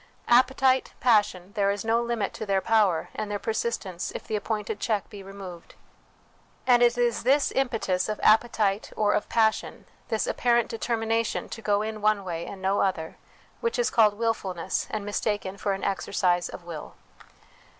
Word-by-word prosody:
Appetite, 260 Hz, +1 st, +4 dB
passion, 205 Hz, -6 st, +2 dB
there 200 Hz, -3 st, +1 dB
is 200 Hz, +1 st, -2 dB
no 230 Hz, +1 st, +2 dB
limit 235 Hz, -4 st, -2 dB
to -, -, -6 dB
their 195 Hz, -1 st, +2 dB
power 200 Hz, -5 st, +2 dB
and 215 Hz, -, -4 dB
their 205 Hz, -, -1 dB
persistence 200 Hz, -3 st, -3 dB
if -, -, -6 dB
the 220 Hz, -, -2 dB
appointed 210 Hz, 0 st, -3 dB
check 215 Hz, -2 st, -1 dB
be 205 Hz, -2 st, -9 dB
removed; 190 Hz, -3 st, -10 dB, 0.9 s
and 245 Hz, -1 st, +5 dB
it 240 Hz, 0 st, +4 dB
is 240 Hz, -2 st, +1 dB
this 275 Hz, +4 st, +3 dB
impetus 225 Hz, -8 st, 0 dB
of 215 Hz, -, -3 dB
appetite 215 Hz, -2 st, +3 dB
or 210 Hz, -1 st, +2 dB
of -, -, -1 dB
passion, 220 Hz, -1 st, 0 dB, 0.2 s
this 220 Hz, -, 0 dB
apparent 240 Hz, -1 st, +1 dB
determination 225 Hz, 0 st, -1 dB
to 225 Hz, -, -7 dB
go 205 Hz, -1 st, +1 dB
in 215 Hz, -1 st, -5 dB
one 210 Hz, -1 st, +2 dB
way 170 Hz, -2 st, -4 dB
and 190 Hz, -1 st, -9 dB
no 195 Hz, +1 st, +1 dB
other, 165 Hz, -5 st, -1 dB, 0.4 s
which 465 Hz, 0 st, -1 dB
is 485 Hz, -, +1 dB
called 215 Hz, -3 st, +4 dB
wilfulness 200 Hz, -6 st, -2 dB
and 210 Hz, -2 st, -4 dB
mistaken 205 Hz, -2 st, -2 dB
for 200 Hz, 0 st, -1 dB
an 195 Hz, -, -5 dB
exercise 185 Hz, -2 st, 0 dB
of -, -, -9 dB
will. 170 Hz, -3 st, -8 dB
215 Hz, 170 wpm, -26 LUFS, 195-230 Hz, 0.9 s, and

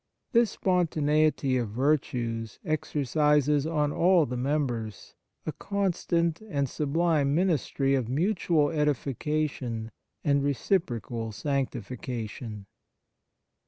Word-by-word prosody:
This 235 Hz, -3 st, +4 dB
spontaneity 155 Hz, -7 st, +2 dB
of 120 Hz, -4 st, -1 dB
virtues 120 Hz, -3 st, -1 dB
exercises 150 Hz, -1 st, +2 dB
on 150 Hz, -3 st, +1 dB
all 175 Hz, 0 st, +4 dB
the 125 Hz, -, -4 dB
members 125 Hz, -6 st, -2 dB, 0.3 s
a -, -, -1 dB
constant 175 Hz, -3 st, -1 dB
and 140 Hz, -5 st, 0 dB
sublime 150 Hz, 0 st, +1 dB
ministry 155 Hz, -6 st, +1 dB
of 130 Hz, -4 st, 0 dB
mutual 165 Hz, -, +1 dB
edification 140 Hz, -5 st, -1 dB, 0.3 s
and 140 Hz, -1 st, +3 dB
reciprocal 120 Hz, -, -1 dB
sanctifi 130 Hz, +2 st, -3 dB
cation. 110 Hz, -3 st, -5 dB
145 Hz, 90 wpm, -28 LUFS, 125-155 Hz, 0.3 s, This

